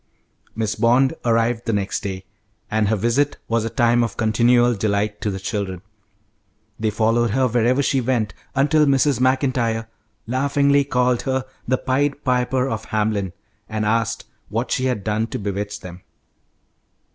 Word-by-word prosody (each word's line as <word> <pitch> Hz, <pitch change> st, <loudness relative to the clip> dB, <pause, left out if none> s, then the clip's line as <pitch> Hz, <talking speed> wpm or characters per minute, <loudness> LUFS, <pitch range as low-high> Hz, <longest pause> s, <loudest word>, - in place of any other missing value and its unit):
Miss 110 Hz, -1 st, -1 dB
Bond 125 Hz, +3 st, +3 dB
arrived 115 Hz, 0 st, +1 dB
the 115 Hz, -, +1 dB
next 100 Hz, -1 st, -1 dB
day, 95 Hz, -1 st, -5 dB, 0.5 s
and 110 Hz, -1 st, +2 dB
her 110 Hz, -, +2 dB
visit 120 Hz, +7 st, +1 dB
was 115 Hz, -1 st, +1 dB
a 115 Hz, -, -2 dB
time 120 Hz, 0 st, +3 dB
of 115 Hz, -4 st, -4 dB
continual 120 Hz, +2 st, +3 dB
delight 105 Hz, 0 st, -1 dB
to 105 Hz, -, -1 dB
the 95 Hz, -1 st, -4 dB
children. 95 Hz, -2 st, -4 dB, 1.0 s
They 110 Hz, 0 st, +1 dB
followed 115 Hz, +2 st, +1 dB
her 130 Hz, +4 st, +2 dB
wherever 125 Hz, +3 st, +2 dB
she 135 Hz, -1 st, +1 dB
went, 115 Hz, -4 st, 0 dB, 0.2 s
until 150 Hz, +2 st, +3 dB
Mrs. 135 Hz, -2 st, +3 dB
Maclntyre 130 Hz, -3 st, +1 dB, 0.4 s
laughingly 140 Hz, +3 st, +2 dB
called 125 Hz, -2 st, +1 dB
her 130 Hz, -1 st, -1 dB, 0.2 s
the 130 Hz, +1 st, +2 dB
'Pied 140 Hz, +3 st, -1 dB
Piper 125 Hz, 0 st, +1 dB
of 110 Hz, -3 st, -4 dB
Hamelin,' 105 Hz, -4 st, -1 dB, 0.4 s
and 110 Hz, -1 st, -2 dB
asked 115 Hz, 0 st, 0 dB, 0.2 s
what 115 Hz, +5 st, -2 dB
she 130 Hz, -, 0 dB
had 125 Hz, -6 st, -1 dB
done 110 Hz, +2 st, 0 dB
to -, -, -4 dB
bewitch 100 Hz, 0 st, -4 dB
them. 90 Hz, 0 st, -10 dB
115 Hz, 155 wpm, -21 LUFS, 105-130 Hz, 1.0 s, Bond